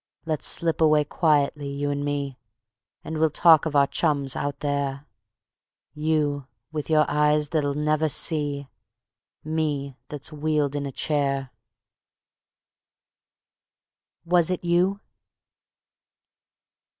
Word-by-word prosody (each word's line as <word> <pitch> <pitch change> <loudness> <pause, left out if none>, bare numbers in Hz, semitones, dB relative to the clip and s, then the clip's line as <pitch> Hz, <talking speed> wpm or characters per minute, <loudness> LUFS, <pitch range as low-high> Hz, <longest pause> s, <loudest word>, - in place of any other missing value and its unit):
Let's 155 -2 -1
slip 165 -1 +1
away 155 -1 +5
quietly, 145 -2 +1
you 140 +1 -2
and 145 0 -2
me, 140 -2 -3 0.6
And 160 0 -4
we'll 160 0 +4
talk 160 +1 +5
of 150 - -4
our 140 -1 +6
chums 140 -3 0
out 140 0 -3
there: 140 -1 -2 0.9
You 150 -3 0 0.2
with 155 -1 -4
your 155 -1 +4
eyes 150 0 +2
that'll 145 -3 0
never 155 +1 +1
see, 145 -2 -1 0.8
Me 150 -3 -2
that's 145 +1 -7
wheeled 150 -1 0
in 140 -1 -2
a - - -5
chair. 140 -2 -1 2.7
Was 175 -1 +3
It 180 -1 -2
You? 180 +3 +1
150 Hz, 110 wpm, -25 LUFS, 140-155 Hz, 2.7 s, our